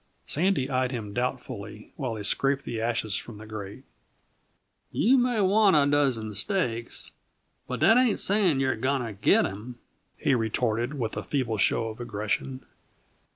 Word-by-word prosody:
Sandy 170 -4 +1
eyed 130 -2 0
him 110 -5 -5
doubtfully 125 +2 -5
while 125 -4 -3
he 105 - -6
scraped 140 +6 +2
the 115 -2 -3
ashes 115 -3 -1
from 115 -3 -8
the 110 - -10
grate. 110 +3 -8 1.1
"You 250 +5 +3
may 245 -4 +2
want 200 -1 +4
a 145 -2 +5
dozen 135 -7 +1
steaks, 120 - -3 0.6
but - - -4
that 225 - +6
ain't 250 -4 +3
saying 195 -8 +2
you're 130 -1 +1
going 130 +3 0
to 110 - -6
git 100 - +3
'em," 110 +5 -7 0.4
he 140 - +1
retorted, 120 +3 0
with 115 -4 -3
a - - -3
feeble 120 -7 -1
show 115 +3 +2
of 110 - -9
aggression. 120 +3 -3
125 Hz, 155 wpm, -27 LUFS, 110-145 Hz, 1.1 s, that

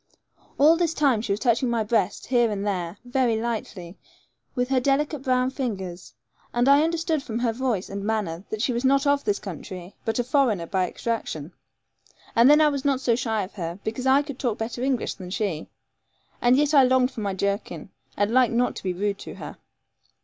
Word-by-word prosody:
All 310 +4 +6
this 335 -2 0
time 270 -7 +2
she 215 - -3
was 200 - 0
touching 240 +1 +2
my 230 -2 +1
breast, 210 -3 0
here 240 -2 +2
and 205 -1 -3
there, 180 -2 -2
very 245 -3 +1
lightly, 210 -6 -5 0.6
with 250 0 0
her 265 -1 +3
delicate 280 +3 0
brown 255 -1 +1
fingers, 190 - -5 0.4
and 240 +2 +2
I 280 +1 +6
understood 325 -1 0
from 230 -5 -5
her 235 -1 0
voice 235 -6 -1
and 200 0 -5
manner 200 -5 -2
that 215 +1 -3
she 255 - +1
was 235 +2 -2
not 275 +2 +3
of 285 0 +2
this 205 -2 0
country, 185 0 -8
but 225 -2 -1
a 245 - +1
foreigner 245 - +1
by 185 +1 0
extraction. 175 -8 -4 0.8
And 235 +3 +6
then 300 +1 +7
I 305 - +6
was 280 -2 -3
not 275 -2 +1
so 240 -3 +2
shy 225 -3 -1
of 185 - -9
her, 170 -2 -5
because 235 +4 -3
I 270 +2 +5
could 280 -3 -8
talk 235 -4 -1
better 230 +2 -4
English 260 -2 0
than 185 -2 -9
she; 185 -5 -2 0.7
and 245 +2 +4
yet 295 +1 +2
I 280 - +8
longed 255 0 +3
for 225 - -7
my 200 -2 -2
jerkin, 200 +2 -3 0.3
but 205 +1 +1
liked 250 -1 +4
not 245 +1 +1
to - - -8
be 185 -1 -1
rude 200 +2 -2
to - - -8
her. - - -9
235 Hz, 210 wpm, -25 LUFS, 200-265 Hz, 0.8 s, I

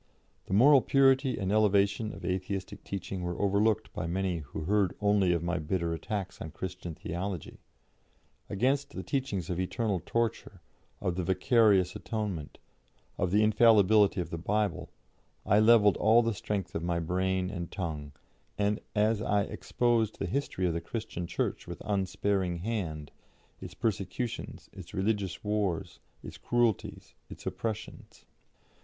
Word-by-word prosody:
The 95 - 0
moral 135 +5 +7
purity 135 0 +3
and 95 -2 -1
elevation 105 0 +2
of - - -9
Atheistic 95 +1 -3
teaching 95 -1 -5
were 90 -1 -3
overlooked 105 +2 +1
by - - -3
many 90 0 -1
who 75 +1 -7
heard 100 +2 +1
only 100 -3 +3
of 85 -1 0
my 85 +1 -1
bitter 85 +1 -1
attacks 95 +3 -4
on 80 - -5
Christian 90 0 -6
theology. 90 0 -5 0.9
Against 130 +8 0
the - - -4
teachings 105 - -2
of 90 - -2
eternal 100 0 -1
torture, 115 -2 -2 0.4
of 90 -1 -1
the 90 - 0
vicarious 95 0 +3
atonement, 105 -7 -4 0.6
of 90 - +1
the 105 +4 +3
infallibility 105 -2 +5
of 85 -2 -3
the 85 - -4
Bible, 105 +4 -1 0.6
I 100 - +4
levelled 110 -2 +6
all 115 +2 +5
the 115 0 0
strength 100 -2 -3
of - - -2
my 85 0 -1
brain 95 +2 0
and 85 -3 -5
tongue, 75 -6 -5 0.4
and 105 0 +1 0.2
I 105 -1 +2
exposed 115 0 0
the - - -2
history 135 -9 -2
of 85 - +1
the 85 - -2
Christian 100 -3 -5
Church - - -2
with - - -7
unsparing 95 -2 0
hand, 80 -10 -3 0.5
its - - -9
persecutions, 115 +2 -3
its 95 +2 -10
religious 100 -2 -1
wars, 105 -5 -1 0.2
its - - -9
cruelties, 120 -4 0 0.2
its - - -11
oppressions. 110 -1 -5
100 Hz, 145 wpm, -30 LUFS, 90-110 Hz, 0.9 s, moral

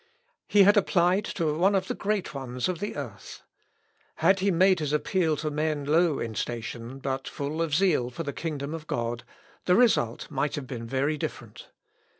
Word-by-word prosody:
He 205 -1 +6
had 205 +2 +6
applied 185 0 +3
to 155 -4 -1
one 190 +5 +3
of 190 -1 0
the - - -1
great 205 -2 -2
ones 125 -2 -3
of 180 -3 -2
the 205 - -4
earth. - - -8 0.7
Had 190 +5 +3
he 195 +2 +2
made 185 0 +4
his 150 -2 -2
appeal 160 0 +1
to 155 0 -3
men 150 -1 -1
low 160 0 +3
in 115 -1 -4
station, 120 +3 -5
but 135 0 -3
full 145 +3 -3
of 160 -3 0
zeal 165 -9 +2
for 165 +7 -6
the 140 -2 -4
kingdom 150 -2 -4
of 165 -1 -7
God, 120 0 -2 0.4
the 180 - +4
result 195 - +2
might 140 0 -1
have 145 - -5
been 120 -3 -6
very 140 +5 0
different. - - -7
155 Hz, 185 wpm, -27 LUFS, 135-185 Hz, 0.7 s, He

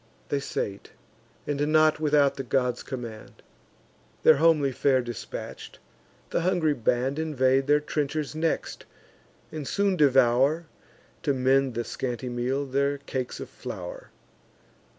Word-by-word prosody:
They 145 - 0
sate; 100 -7 -5 0.5
and, 145 +1 -1
(not 155 0 +4
without 145 -2 +3
the 135 - -5
god's 125 -1 0
command,) 115 -4 -8 0.8
Their 155 - +7
homely 155 -3 +4
fare 130 0 +2
dispatch'd, 120 -3 -7 0.5
the - - +1
hungry 170 -4 +2
band 125 +3 0
Invade 135 -3 +2
their 145 +1 +5
trenchers 150 0 -2
next, 160 +1 -2 0.6
and 150 -3 -6
soon 200 -1 +1
devour, 135 +1 +4 0.6
To 140 -3 0
mend 130 0 +2
the 120 - -1
scanty 125 +1 -4
meal, 125 +3 -1
their 140 +1 0
cakes 130 -3 -5
of - - -6
flour. - - -8
140 Hz, 125 wpm, -26 LUFS, 130-155 Hz, 0.8 s, Their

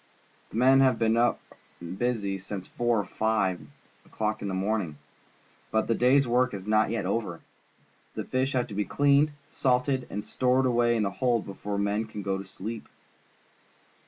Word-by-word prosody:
The - - -12
men 130 +2 +6
have 130 -3 +4
been 110 0 +2
up 120 0 +2 0.4
and 85 +1 -7
busy 105 -4 -1
since 95 0 -7
four 120 -2 0
or 100 - -2
five 105 -3 0 0.4
o'clock 110 0 -3
in 100 - -3
the 95 - -2
morning, 95 -5 -1 0.7
but 110 0 +1
the 115 - +2
day's 130 +3 +4
work 125 -1 +2
is 95 -1 -7
not 110 0 +3
yet 110 -4 -2
over. 95 -4 -2 0.8
The - - -3
fish 130 +2 -1
have 125 -2 +1
to - - -7
be 105 +1 0
cleaned, 145 +5 +3 0.2
salted, 130 0 0
and 105 +1 -5
stored 130 +1 +1
away 120 -1 +3
in 110 - +1
the 100 - -1
hold 120 0 0
before 100 +1 -5
the 100 - +1
men 105 +2 0
can 105 -2 -7
go 95 0 -1
to 95 - -7
sleep. 105 +4 -7
110 Hz, 185 wpm, -27 LUFS, 100-125 Hz, 0.8 s, men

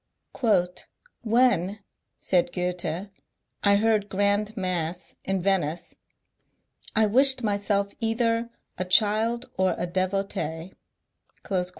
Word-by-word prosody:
" 180 - -4
When," 215 -4 +2 0.4
said 175 -2 +1
Gk>ethe, 180 +1 -3 0.3
" - - -46
I 200 -1 +5
heard 210 -1 +1
grand 205 +3 0
mass 180 -2 -2
in 190 -2 -2
Venice, 175 -3 0 1.0
I 220 -1 +4
wished 260 +4 +5
myself 200 -1 0
either 230 0 0 0.3
a 185 - 0
child 220 +5 +2
or 190 0 +2
a - - -2
devotee." 185 -2 -2
200 Hz, 100 wpm, -25 LUFS, 180-220 Hz, 1.0 s, I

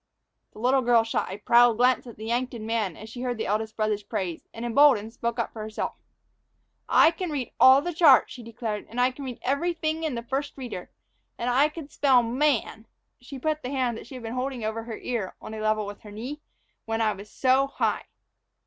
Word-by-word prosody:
The - - -16
little 255 +4 +2
girl 240 -2 +4
shot 225 -4 -2
a 190 - -5
proud 235 +2 +5
glance 250 +1 +3
at 235 - -11
the 215 - -8
Yankton 240 -1 -2
man 220 -6 -1
as 215 - -10
she 240 +2 -8
heard 250 -2 -2
the 220 - -2
eldest 215 +2 -2
brother's 215 -1 0
praise, 195 -5 -4
and, 230 +1 -6
emboldened, 235 -3 +4
spoke 235 0 -3
up 235 - -2
for 220 - -7
herself. 215 0 -4 1.0
"I 320 - +6
can 360 +1 -4
read 275 -6 -3
all 265 +2 +8
the 350 +1 -3
chart," 305 -5 +6
she 250 - -10
declared, 225 -2 -5
"and 235 - -5
I 250 +1 +4
can 275 +2 -9
read 250 -3 -6
everyfing 315 +3 -1
in 305 -5 -1
the 235 - -4
First 275 +4 -3
Reader. 240 -9 -7 0.5
And 245 +1 -1
I 280 +5 +4
could 305 -2 -9
spell 260 -4 +4
'man'" 235 -3 0 0.3
she 260 +2 -9
put 310 +3 -1
the 250 - -5
hand 255 -4 0
that 225 - -9
she 265 - -10
had 250 - -8
been 225 +1 -5
holding 255 -2 -3
over 225 +1 -3
her 225 -2 -6
ear 230 -7 -4
on 220 - -9
a 220 - -6
level 215 -1 +1
with 205 0 -8
her 210 - -12
knee 250 +9 -7 0.4
"when 225 0 -2
I 220 -2 +2
was 200 +1 -11
so 265 +3 +2
high." - - -1
240 Hz, 220 wpm, -26 LUFS, 220-270 Hz, 1.0 s, all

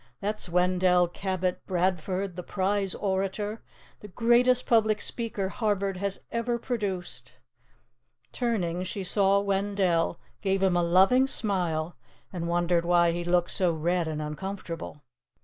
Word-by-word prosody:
That's 210 -2 -3
Wendell 180 0 +3
Cabot 185 0 -2
Bradford, 185 +1 -1
the 180 - -5
prize 195 +1 -1
orator, 200 +2 -2 0.4
the 210 - -10
greatest 240 +4 +3
public 220 -2 +3
speaker 215 -5 -2
Harvard 200 -3 -1
has 200 +1 -3
ever 235 +1 -1
produced.'" 205 -7 -4 1.0
Turning, 185 -8 -1
she 185 +2 -4
saw 195 +1 +3
Wendell, 195 -4 0 0.2
gave 195 -1 0
him 185 -2 +3
a 175 - +3
loving 190 +10 +4
smile, 175 -9 -1 0.4
and 170 -2 -3
wondered 175 0 +1
why 170 0 +4
he 175 +1 -3
looked 175 0 +1
so 180 -2 +2
red 170 +2 0
and 155 -1 -3
uncomfortable. 165 -1 -6
190 Hz, 130 wpm, -27 LUFS, 175-205 Hz, 1.0 s, loving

